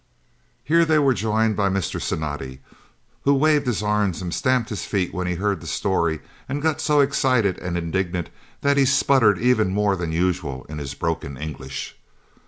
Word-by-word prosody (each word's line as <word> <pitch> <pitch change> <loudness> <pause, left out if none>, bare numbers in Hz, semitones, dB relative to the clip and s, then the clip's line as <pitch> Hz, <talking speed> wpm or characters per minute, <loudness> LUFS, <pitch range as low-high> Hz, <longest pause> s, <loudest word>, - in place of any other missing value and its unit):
Here 165 +3 +4
they 160 -1 +3
were 140 -3 +4
joined 110 +1 +1
by 100 -1 +1
Mr. 95 -2 -2
Cinatti, 75 -4 -4 0.6
who 140 0 +4
waved 150 -1 +3
his 110 -4 0
arms 105 -4 0
and 90 -2 -4
stamped 130 -3 +1
his 105 - -3
feet 95 -4 -1
when 90 -1 -2
he 90 - -1
heard 100 0 -1
the 85 - -9
story, 85 -2 0 0.3
and 140 +2 -2
got 155 0 0
so 150 -1 +3
excited 130 -8 +2
and 90 -1 -3
indignant 85 0 -2 0.3
that 140 0 +2
he 140 - +5
spluttered 130 -6 +4
even 120 -5 +2
more 100 +1 +1
than 85 -3 -3
usual 85 -6 -1
in 75 +1 -6
his 70 -1 -6
broken 75 -3 -3
English. 70 -2 -7
100 Hz, 180 wpm, -23 LUFS, 85-130 Hz, 0.6 s, he